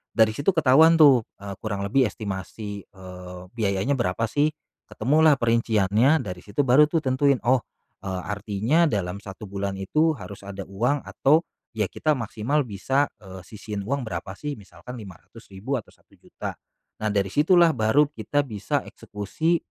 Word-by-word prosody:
Dari 110 -1 +5
situ 140 - 0
ketahuan 160 +2 +6
tuh, 140 -5 +7 0.2
eee, 100 -1 -6
kurang 100 -3 -3
lebih 130 +6 +3
estimasi, 100 0 -6
eee, 90 -1 -11
biayanya 110 +3 0
berapa 105 0 0
sih? 145 +4 +2 0.4
Ketemulah 150 +6 +3
perinciannya, 115 +4 +2
dari 90 -2 -6
situ 105 +7 -1
baru 135 +4 +6
tuh 165 -1 0
tentuin 135 +1 +3
oh, 130 +1 +4 0.4
eee, 95 -1 -3
artinya 105 - +1
dalam 100 -3 -2
1 100 +1 -9
bulan 100 0 -3
itu 155 +11 +1
harus 95 -1 -10
ada 100 0 -6
uang 120 +9 -1
atau 155 +5 +2 0.3
ya 105 - +2
kita 155 - +1
maksimal 120 +6 -1
bisa, 130 +8 0
eee, 95 -2 -10
sisihin 105 0 -7
uang 140 +5 -1
berapa 90 0 -5
sih? 150 -1 -4
Misalkan 100 +6 -11
Rp500.000 105 +3 -8
atau 110 - -9
Rp1.000.000 - - -10 0.5
nah 110 - 0
dari 100 -1 0
situlah 170 +2 +5
baru 120 +6 +3
kita 145 -1 -1
bisa 105 -6 -2
eksekusi, 155 - -2
110 Hz, 150 wpm, -24 LUFS, 100-140 Hz, 0.5 s, tuh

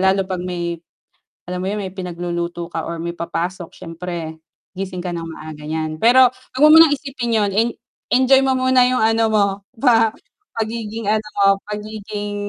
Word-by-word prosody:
lalo 190 0 +3
pag 185 -1 -4
may 175 -2 -3 0.7
alam 180 0 -4
mo 190 - -2
yun 210 - -2
may 190 -2 -5
pinagluluto 175 -1 -4
ka 165 - -2
or 170 - -5
may 170 +1 -4
papasok 170 +1 -4
siyempre 165 -1 -6 0.4
gising 185 -1 -5
ka 175 -1 -4
ng 165 - -4
maaga 155 -1 -9
niyan, 155 0 -3
pero 250 +2 +7
'wag 255 +1 -10
mo - - +10
munang 320 -2 +8
isipin 270 -5 -3
yun, 210 -3 +2
i-enjoy 245 +4 +1
mo 265 -1 +2
muna 255 -1 +4
yung, 255 - +1
ano, 225 +1 +3
mo 210 -2 +4 0.3
pa 225 -4 +4 0.5
pagiging, 225 -1 -4
ano, 215 0 +1
mo, 200 - +5 0.2
pagiging 210 0 -5
200 Hz, 170 wpm, -20 LUFS, 175-230 Hz, 0.7 s, mo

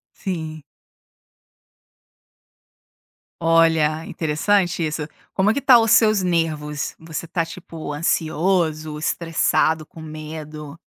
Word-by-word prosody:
Sim. 160 -5 -5 2.8
Olha, 165 -1 +3
interessante 175 +4 0
isso, 150 -1 -2 0.2
como 200 +2 +2
é - - +1
que 280 - -2
tá 255 -3 +7
os 225 -1 +2
seus 215 -4 +5
nervos? 155 -4 -1
Você 160 0 -6
está, 165 0 -1
tipo, 165 -3 -8
ansioso, 155 -1 0
estressado, 160 -1 +1
com 160 - -13
medo? 155 -1 -8
160 Hz, 100 wpm, -22 LUFS, 155-175 Hz, 2.8 s, tá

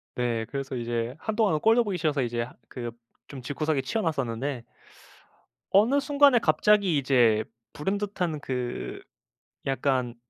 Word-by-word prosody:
네. 120 -2 -1
그래서 135 -1 -4
이제 120 0 -2
한동안은 210 -6 +1
꼴도 225 +6 +4
보기 200 -4 -2
싫어서 155 -4 0
이제 120 -1 -1
하 120 - -10 0.2
그 120 -2 -5 0.4
좀 135 -2 -8
집구석에 145 +3 -1
치워 175 +12 -2
놨었는데 135 -4 -2 1.1
어느 225 +9 +5
순간에 280 -2 +5
갑자기 205 -7 +3
이제 120 -6 +3 0.3
불현듯한 190 -2 -2
그 125 -3 -4 0.6
약간 130 -2 0
140 Hz, 285 characters per minute, -27 LUFS, 125-200 Hz, 1.1 s, 어느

